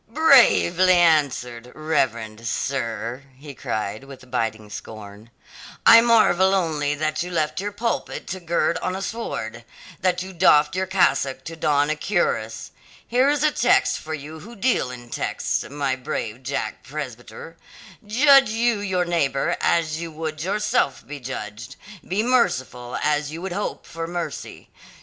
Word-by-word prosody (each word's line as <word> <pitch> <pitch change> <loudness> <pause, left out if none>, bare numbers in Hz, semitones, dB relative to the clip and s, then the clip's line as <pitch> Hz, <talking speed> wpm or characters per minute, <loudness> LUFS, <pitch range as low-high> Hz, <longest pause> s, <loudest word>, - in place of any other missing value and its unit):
"Bravely 225 - +5
answered, 135 -8 +1
reverend 115 -8 -1
sir," 120 0 -3 0.2
he 145 +1 -10
cried 110 -2 -4
with 130 -2 -13
biting 110 -3 -2
scorn. 105 +1 -10 0.6
"I 230 - +9
marvel 205 -5 +4
only 150 -5 0
that 155 +1 -1
you 180 - -3
left 160 0 -1
your 205 +1 -3
pulpit 230 +3 -3
to 190 - -4
gird 170 -1 0
on 185 - -2
a 190 - -5
sword; 120 - -5 0.4
that 180 0 0
you 190 0 -9
doffed 150 -2 +4
your 190 0 -1
cassock 140 -8 +1
to 165 - -7
don 145 -2 +1
a - - 0
cuirass. 130 - -1 0.4
Here 255 +4 +3
is 295 0 +1
a 305 - +4
text 245 -2 +2
for 155 0 -5
you 155 +2 -9
who 230 +9 -12
deal 230 - +1
in 120 -1 -10
texts, - - -2
my 140 -2 -1
brave 125 -2 -5
Jack 135 +2 -4
Presbyter 135 +1 -8 0.5
'Judge 270 +4 +5
you 230 0 +1
your 190 -3 -1
neighbour 170 -1 0
as 160 -2 +1
you 165 -1 -6
would 155 0 -5
yourself 210 - 0
be 145 0 -8
judged; 115 -3 -7 0.3
be 195 +4 0
merciful 130 - 0
as 150 -1 0
you 160 - -6
would 190 -2 -4
hope 205 - -4
for 165 0 -6
mercy.' 175 0 -6
155 Hz, 150 wpm, -23 LUFS, 130-190 Hz, 0.6 s, I